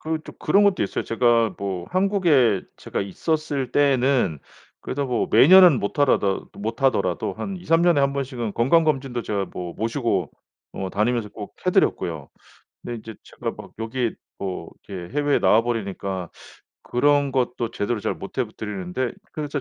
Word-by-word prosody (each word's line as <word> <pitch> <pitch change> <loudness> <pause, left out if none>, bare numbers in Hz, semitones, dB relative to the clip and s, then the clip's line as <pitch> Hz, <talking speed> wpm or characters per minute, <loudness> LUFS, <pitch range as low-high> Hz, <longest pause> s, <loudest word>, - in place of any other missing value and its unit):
그 160 0 -2
좀 - - -11
그런 200 +7 +3
것도 200 -2 +3
있어요. 100 - -2
제가 115 -3 +2
뭐 95 -3 -4
한국에 175 - +3 0.2
제가 - - -4
있었을 140 - -2
때에는 135 - +2 0.4
그래도 140 +1 -2
뭐 125 -2 -1
매년은 180 -3 +8
못하라다 100 -3 +1
못하더라도 110 - 0
한 195 -1 -5
2-3 165 -2 +2
년에 175 -3 +4
1 140 0 +2
번씩은 130 -6 -3
건강 155 +8 +3
검진도 135 -5 -1
제가 100 -3 -2
뭐 90 -1 -6
모시고 115 - -1 0.4
어 95 -1 -4
다니면서 110 +1 0
꼭 105 0 -9
해 - - +4
드렸고요. - - 0 0.6
근데 120 - -5
인제 110 0 -9
제가 - - -5
막 - - -12
여기에 115 +1 -2 0.3
뭐 90 -4 -5 0.2
이렇게 90 +3 -7
해외에 145 -1 +2
나와버리니까 100 -5 0 0.5
그런 145 +2 +2
것도 125 -3 -1
제대로 105 +2 -2
잘 - - -2
못해 130 +6 -3
드리는데. 105 +3 -3 0.2
그래서 145 -2 -3
120 Hz, 325 characters per minute, -23 LUFS, 100-145 Hz, 0.6 s, 매년은